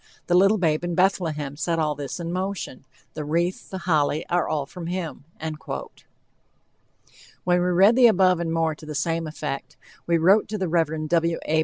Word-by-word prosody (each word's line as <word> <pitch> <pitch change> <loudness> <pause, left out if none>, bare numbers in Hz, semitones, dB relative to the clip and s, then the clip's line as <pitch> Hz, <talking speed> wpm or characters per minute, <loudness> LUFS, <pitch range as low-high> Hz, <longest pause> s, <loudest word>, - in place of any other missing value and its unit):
The 175 - 0
little 195 +4 +5
babe 160 -4 +1
in 175 -1 -2
Bethlehem 160 -7 0
set 165 +2 -1
all 155 -2 +1
this 145 +3 -6
in 170 0 -4
motion, 185 -8 -4 0.3
the 155 - -5
wreath, 170 +5 -1
the 190 - -5
holly, 155 -4 +1
are 175 0 +1
all 150 -3 -1
from 170 +4 -8
him." 175 -5 -4
When 160 0 -5 1.9
we 180 0 +3
read 190 +5 +5
the 250 -1 +7
above 185 -4 +4
and 170 -1 -2
more 165 -1 +1
to 155 - -13
the 150 - -5
same 165 +2 -1
effect, 150 -3 -5 0.3
we 170 -1 +3
wrote 190 +6 +4
to 215 - -4
the 190 -2 -1
Rev. 160 -2 0
W. 165 0 +1
A. 155 +1 +2
165 Hz, 185 wpm, -24 LUFS, 155-180 Hz, 1.9 s, the